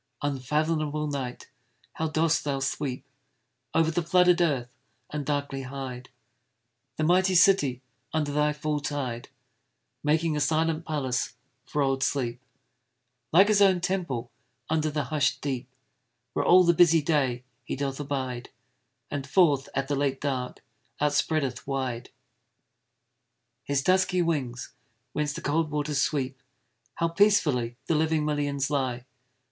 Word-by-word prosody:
Unfathomable 150 +2 0
Night! 135 -4 -4 0.5
how 160 - -2
dost 160 +1 +1
thou 140 -2 -1
sweep 135 -1 -3 0.7
Over 165 0 +3
the 175 - 0
flooded 180 +1 +4
earth, 135 -7 0 0.4
and 150 -1 -3
darkly 140 -1 -2
hide 130 -1 -7 0.9
The 155 - -2
mighty 185 +3 +3
city 150 -9 +4 0.3
under 150 -2 -1
thy 150 +1 +2
full 150 0 -2
tide; 135 -5 -4 0.7
Making 155 +1 +2
a - - 0
silent 160 +2 0
palace 135 -5 -1 0.3
for 145 - 0
old 135 -1 0
Sleep, 125 -2 -1 0.9
Like 190 +5 +7
his 210 -1 +3
own 190 -2 +5
temple 170 -11 -2 0.4
under 155 -1 +1
the 150 0 -1
hush'd 150 -1 0
deep, 135 -3 -4 0.6
Where - - 0
all 185 +1 +7
the 170 -1 +4
busy 165 -2 +5
day 135 -6 +1 0.2
he - - -4
doth 135 0 -3
abide, 130 -4 -3 0.6
And 140 -2 -3
forth 145 -5 +3
at 135 - -1
the 145 - 0
late 135 -1 0
dark, 130 -3 -3 0.4
outspreadeth 145 -3 0
wide 130 -3 -3 1.6
His 140 -1 0
dusky 185 0 +3
wings, 130 -7 -2 0.4
whence 150 -1 -1
the - - -6
cold 155 +2 0
waters 150 -1 -1
sweep! 135 -3 -1 0.5
How 165 - +1
peacefully 165 - +2
the - - +1
living 155 0 +1
millions 145 -2 -1
lie! 130 -3 -1
145 Hz, 130 wpm, -27 LUFS, 135-160 Hz, 1.6 s, Like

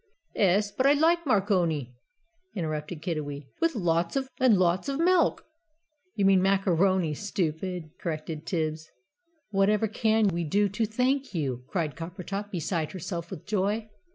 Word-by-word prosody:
"'Es, 205 +1 +2
but 260 +6 +2
I 280 - +7
like 330 +2 +2
marconi!" 180 - +1 0.6
interrupted 155 -2 -4
Kiddiwee, 145 -5 -4
"with 330 -3 +1
lots 170 +1 +1 0.2
and 250 -6 +5
lots 180 +6 +1
of 275 +1 -2
milk!" 350 0 +3 0.7
"You 200 - +1
mean 195 -1 +5
macaroni, 190 -3 +2
stupid!" 180 -2 -3
corrected 155 -2 -5
Tibbs. 155 -2 -2 0.6
"Whatever 205 +2 +3
CAN 220 0 +2
we 170 -1 -2
do 200 +7 +2
to 210 +3 -1
thank 255 +2 0
you?" 130 -6 -2
cried 165 -7 -2
Coppertop, 185 +4 -5
beside 170 -3 -2
herself 170 -2 -5
with - - -8
joy. 210 +2 -1
185 Hz, 135 wpm, -27 LUFS, 165-210 Hz, 0.7 s, I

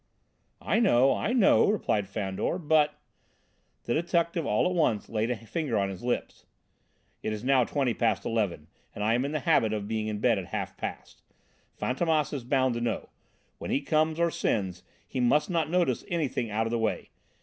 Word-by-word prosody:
"I - - +2
know, 135 - +4
I 215 - -1
know," 240 -6 +5
replied 105 - 0
Fandor, 95 - -2
"but 150 -3 +2 0.4
" - - -43
The 120 - 0
detective 170 0 0
all 105 - +2
at 180 - +1
once 125 - +1
laid 110 +1 -1
a 125 - 0
finger 120 +2 -3
on 100 -1 +1
his 95 -2 -7
lips. 120 0 -3 0.7
"It's 110 0 -3
now 130 -1 +4
twenty 135 -3 0
past 115 -1 0
eleven, 100 -9 -1 0.3
and 105 - -3
I 110 +2 +2
am 125 +3 +1
in 140 - -3
the 155 -1 -2
habit 110 -3 +3
of 105 -1 -3
being 110 0 -2
in 105 -1 -2
bed 110 -1 +2
at 95 - -6
half - - -4
past. - - -7 0.6
Fantômas 155 +3 0
is 135 -4 -4
bound 130 0 +1
to 120 - -3
know 120 -1 +1
it: - - -17 0.5
when - - -6
he - - +2
comes 155 +2 +1
or 170 0 +2
sends, 95 - -1 0.3
he - - -4
must 145 +8 +2
not 165 -3 0
notice 175 0 +1
anything 150 -9 -1
out 110 +2 0
of 115 - -3
the 120 - 0
way. 110 -1 -2
125 Hz, 195 wpm, -28 LUFS, 110-155 Hz, 0.7 s, know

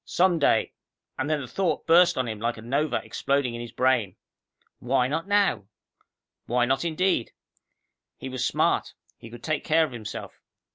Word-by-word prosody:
Some 180 -2 +2
day 145 - +2 0.5
and 140 +3 -1
then 155 -2 0
the 130 - -7
thought 170 +1 -1
burst 175 +1 +5
on 130 -1 0
him 110 -2 -5
like 115 +1 -2
a 110 - -10
nova 140 +6 0
exploding 140 -3 -1
in 120 - -5
his 120 - -8
brain. 125 -5 +1 0.6
Why 125 0 +1
not 160 +7 -3
now? 200 - +2 0.8
Why 120 +1 +2
not 135 +3 0
indeed? 170 -5 0 0.8
He - - -7
was 130 -1 -3
smart; - - 0 0.2
he 115 - -11
could 120 0 -12
take 155 -2 -1
care 160 +1 +3
of 150 - -9
himself. 115 -3 -8
135 Hz, 175 wpm, -26 LUFS, 120-160 Hz, 0.8 s, burst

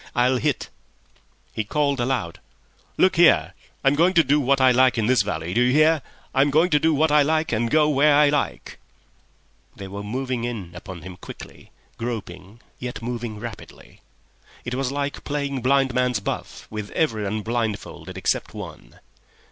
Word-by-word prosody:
I'll 125 +1 +3
hit." 120 - -1 0.8
He 110 - -2
called 140 +4 0
aloud, 120 -9 -2 0.6
"Look 185 -2 +3
here, 170 0 +5 0.3
I'm 135 0 +4
going 170 +5 +3
to 165 - +6
do 145 +1 +2
what 135 0 +2
I 130 -1 +6
like 130 0 +4
in 110 - +1
this 125 +2 +4
valley! 80 +3 -3
Do 120 - +2
you 125 +1 +3
hear? 155 +2 +4 0.3
I'm 135 +2 +3
going 160 +5 +3
to 150 - +4
do 160 +2 +2
what 155 +1 +2
I 150 0 +6
like 155 +2 +1
and 115 +1 0
go 155 +2 +4
where 145 0 +4
I 150 0 +5
like." 145 0 -2 1.0
They 100 - -8
were 100 +1 -7
moving 125 +3 -3
in 110 -8 -5
upon 85 -1 -9
him 90 0 -9
quickly, - - -12 0.3
groping, 105 -3 -6 0.2
yet 125 -2 -6
moving 120 -3 -4
rapidly. 115 -2 -10 0.6
It 120 - -4
was 130 0 -1
like 140 0 -3
playing 140 -2 -3
blind 135 +1 +2
man's 125 -3 +1
buff 100 - -5
with 105 -1 -5
everyone 110 -7 -1
blindfolded 115 -2 -4
except - - -1
one. - - -10
125 Hz, 170 wpm, -23 LUFS, 110-145 Hz, 1.0 s, to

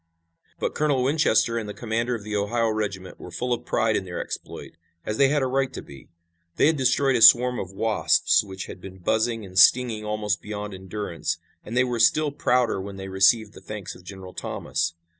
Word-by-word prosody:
But - - -2
Colonel 145 -4 +1
Winchester 125 -5 +2
and 105 -2 -6
the 105 - -7
commander 115 +1 -2
of 110 - -7
the 105 0 -4
Ohio 115 +3 0
regiment 100 -3 -4
were - - -9
full 120 +9 -2
of 120 +1 -5
pride 110 -1 +1
in - - 0
their 90 -2 -6
exploit, - - -7 0.3
as 105 - -3
they 140 - +5
had 145 0 +1
a - - +2
right 135 0 0
to - - -6
be. 70 -3 -14 0.5
They - - +3
had 160 +2 +4
destroyed 135 0 +2
a 120 - +1
swarm 125 +2 +7
of 95 - -5
wasps 110 +2 +2
which 95 -2 -7
had - - -10
been 95 0 -10
buzzing 110 +4 -1
and 95 0 -1
stinging 115 +2 +5
almost 105 -1 -2
beyond 105 -1 -6
endurance, 95 -1 -4 0.3
and 115 +3 -5
they 125 - +5
were 120 -2 -2
still 150 +5 +3
prouder 125 -7 +1
when 100 +1 -7
they 95 0 -7
received 100 +3 +3
the - - -13
thanks 105 -3 -7
of - - -15
General 95 0 -10
Thomas. 85 0 -3
110 Hz, 210 wpm, -24 LUFS, 95-125 Hz, 0.5 s, swarm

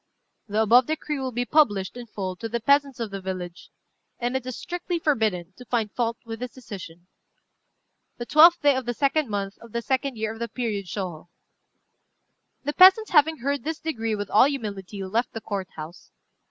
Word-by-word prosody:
"The 215 +1 +1
above 235 +3 +5
decree 305 -2 -2
will 260 -1 -3
be 245 +1 -2
published, 210 - +2
in 245 -1 -8
full, 190 -4 -4
to 225 - -5
the 235 +1 -1
peasants 280 +2 +2
of 225 -3 -3
the 195 -1 -5
village; 180 -2 -6 0.5
and 245 +1 -2
it 260 -1 -2
is 255 - -5
strictly 350 0 -3
forbidden 220 - 0
to 250 - -12
find 225 -4 -1
fault 230 -1 -1
with 225 -1 -6
this 250 -1 -6
decision. 185 -8 -10 1.1
"The 240 - -5
12th 335 +6 +7
day 290 -2 +4
of 260 -2 -3
the 240 - -1
2d 285 +2 +1
month, 200 -2 -4
of 230 -2 -15
the 235 0 -2
2d 265 0 -1
year 220 0 -2
of 225 - -12
the 235 - -2
period 215 -4 -3
Shôhô." 175 -3 -5 1.4
The 295 +2 -2
peasants, 380 +5 +7
having 315 0 +4
heard 280 +2 -1
this 320 +1 -3
degree 225 -10 -2
with 205 -1 -5
all 215 - +7
humility, 205 -8 -4
left 225 +7 -1
the 225 - -4
Court 195 -3 -4
house. 160 +3 -9
235 Hz, 195 wpm, -25 LUFS, 205-275 Hz, 1.4 s, 12th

